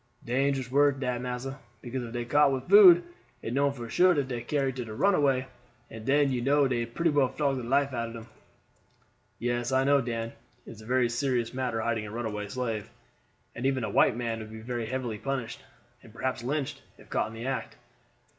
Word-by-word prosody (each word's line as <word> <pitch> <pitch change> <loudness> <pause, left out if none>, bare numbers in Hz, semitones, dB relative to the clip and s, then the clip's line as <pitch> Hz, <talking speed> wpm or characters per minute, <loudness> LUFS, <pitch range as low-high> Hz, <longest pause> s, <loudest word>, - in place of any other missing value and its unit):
Dangerous 130 +1 0
work 140 0 +3
dat, 125 -2 -2
massa; 125 +2 -5 0.2
because 130 +1 -4
if 115 - -7
dey 120 0 -3
caught 145 +3 +4
with 130 -1 -3
food, 185 -3 +9 0.4
it 115 - -3
known 140 +1 +2
for 120 -4 -7
sure 180 +11 +4
dat 140 -3 0
dey 120 -2 -3
carry 140 0 0
it 130 - -6
to 115 -4 -5
runaway, 140 - +2 0.5
and 110 0 -9
den 140 0 +3
you 125 -2 -1
know 140 +2 +3
dey 120 -2 -1
pretty 165 +8 0
well 145 -3 +3
flog 140 0 -1
the 125 - -4
life 135 +3 +1
out 115 -1 -2
of 115 - -9
dem." 115 0 -9 1.1
"Yes, 120 +1 -1
I 130 0 +3
know, 140 0 +4
Dan; 115 -2 -4 0.3
it - - -10
is 110 -1 -12
a 110 - -13
very 125 0 +3
serious 120 -1 -1
matter 125 -3 -2
hiding 110 -2 -1
a - - -8
runaway 110 -3 -4
slave, 115 -2 -3 0.6
and 125 +3 -2
even 135 -2 0
a 110 - -2
white 110 - +4
man 115 -2 -2
would 110 -1 -8
be 110 0 -9
very 120 -1 -4
heavily 120 -3 -3
punished, 135 -3 -3 0.4
and 115 - -15
perhaps 130 +3 -3
lynched, 140 +2 -2 0.2
if - - -18
caught - - +1
in 110 - -10
the 115 +2 -6
act. 135 0 -3
125 Hz, 210 wpm, -28 LUFS, 115-135 Hz, 1.1 s, food